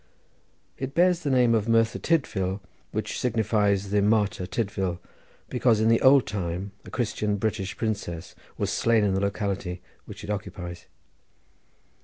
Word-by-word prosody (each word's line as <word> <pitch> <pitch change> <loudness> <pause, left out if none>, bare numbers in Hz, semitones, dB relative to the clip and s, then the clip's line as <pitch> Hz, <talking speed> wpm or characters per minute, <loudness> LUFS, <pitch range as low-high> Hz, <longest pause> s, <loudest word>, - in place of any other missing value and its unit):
It 135 +1 -4
bears 180 0 +4
the 150 - -2
name 125 -3 +4
of 110 0 +1
Merthyr 115 0 +3
Tydvil, 100 - 0 0.3
which - - -3
signifies 105 -4 +1
the 105 0 +3
Martyr 105 -2 +1
Tydvil, 95 -4 -2 0.5
because 120 -3 +2
in 110 +1 +3
the 115 - +4
old 135 0 +6
time 95 -1 -3
a - - -11
Christian 110 -4 -1
British 100 -2 -2
princess 100 -7 -3 0.2
was - - -1
slain 115 -2 +3
in 100 -2 +2
the 95 - 0
locality 100 -3 -2 0.3
which - - -10
it - - -4
occupies. 90 -4 -6
105 Hz, 145 wpm, -26 LUFS, 95-115 Hz, 0.5 s, old